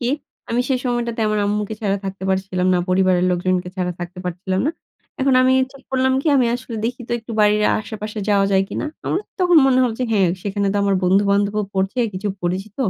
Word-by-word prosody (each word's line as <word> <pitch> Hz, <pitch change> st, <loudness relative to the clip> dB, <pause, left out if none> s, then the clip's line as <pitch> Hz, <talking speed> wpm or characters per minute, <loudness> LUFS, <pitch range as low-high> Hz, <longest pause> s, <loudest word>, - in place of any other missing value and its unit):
কি 240 Hz, -, -1 dB, 0.4 s
আমি 235 Hz, +1 st, +1 dB
সেই 260 Hz, -, +1 dB
সময়টাতে 235 Hz, -2 st, -1 dB
আমার 215 Hz, 0 st, 0 dB
আম্মুকে 210 Hz, +1 st, -1 dB
ছাড়া 200 Hz, -2 st, 0 dB
থাকতে 195 Hz, 0 st, -6 dB
পারছিলাম 190 Hz, -1 st, 0 dB
না। -, -, +3 dB
পরিবারের 185 Hz, -1 st, +3 dB
লোকজনকে 180 Hz, 0 st, 0 dB
ছাড়া 180 Hz, -1 st, -1 dB
থাকতে 175 Hz, +1 st, -7 dB
পারছিলাম 185 Hz, +2 st, -2 dB
না। -, -, +2 dB, 0.5 s
এখন 265 Hz, -1 st, +3 dB
আমি 255 Hz, -, +4 dB, 0.2 s
ঠিক 275 Hz, -1 st, -15 dB
করলাম 260 Hz, 0 st, +2 dB
কি -, -, -6 dB
আমি 250 Hz, -2 st, +3 dB
আসলে 245 Hz, -2 st, -6 dB
দেখি 250 Hz, +2 st, -2 dB
তো -, -, -2 dB
একটু 225 Hz, +1 st, -12 dB
বাড়ির 210 Hz, 0 st, +4 dB, 0.2 s
আশেপাশে 215 Hz, 0 st, -6 dB
যাওয়া 200 Hz, -1 st, +3 dB
যায় 190 Hz, 0 st, +4 dB
কিনা। -, -, -3 dB, 0.2 s
আমার 370 Hz, -, 0 dB, 0.2 s
তখন 355 Hz, -2 st, +4 dB
মনে 255 Hz, -1 st, +4 dB
হলো 235 Hz, -3 st, +1 dB
যে 255 Hz, -, +2 dB
হ্যাঁ, 195 Hz, -4 st, +3 dB
সেখানে 200 Hz, 0 st, -1 dB
তো -, -, -1 dB
আমার 200 Hz, -1 st, +2 dB
বন্ধু-বান্ধবও 200 Hz, +2 st, +2 dB
পড়ছে 195 Hz, +5 st, -1 dB
কিছু 190 Hz, +3 st, -3 dB
পরিচিত। 190 Hz, +4 st, -3 dB
205 Hz, 205 wpm, -20 LUFS, 190-235 Hz, 0.5 s, আমি